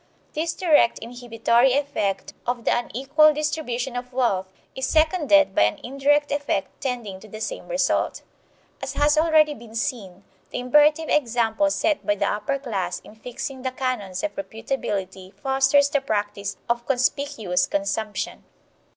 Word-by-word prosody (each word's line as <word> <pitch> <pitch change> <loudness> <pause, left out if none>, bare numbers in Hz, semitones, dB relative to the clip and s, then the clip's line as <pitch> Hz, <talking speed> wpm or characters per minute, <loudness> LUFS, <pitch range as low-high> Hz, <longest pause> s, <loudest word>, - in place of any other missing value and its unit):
This 325 +2 -2
direct 305 -9 +4
inhibitory 240 +1 +1
effect 275 -9 -1
of 245 -1 -2
the - - +3
unequal 275 +7 +3
distribution 290 -5 -2
of 250 +1 -5
wealth 235 -7 0 0.3
is 265 - -2
seconded 310 - +3
by - - +2
an 105 - -1
indirect 285 +3 +1
effect 285 -9 -2
tending 235 -8 -4
to 215 - -13
the 215 +1 -9
same - - -5
result. - - 0 0.6
As - - -4
has 295 +1 +3
already 310 -1 +4
been 230 -4 -13
seen, 205 -6 -3 0.3
the - - -5
imperative 295 +5 +4
example 240 0 +2
set 305 +1 0
by 310 - +1
the - - 0
upper 210 +7 -1
class 225 -9 -3
in - - -15
fixing 250 +4 -6
the 260 - -1
canons 255 -8 -3
of 310 - -2
reputability 200 -8 -4
fosters 270 +5 +3
the 285 -1 0
practice 205 -5 -2
of 235 0 -1
conspicuous 250 -8 0
consumption. 205 +2 -3
255 Hz, 145 wpm, -24 LUFS, 220-290 Hz, 0.6 s, direct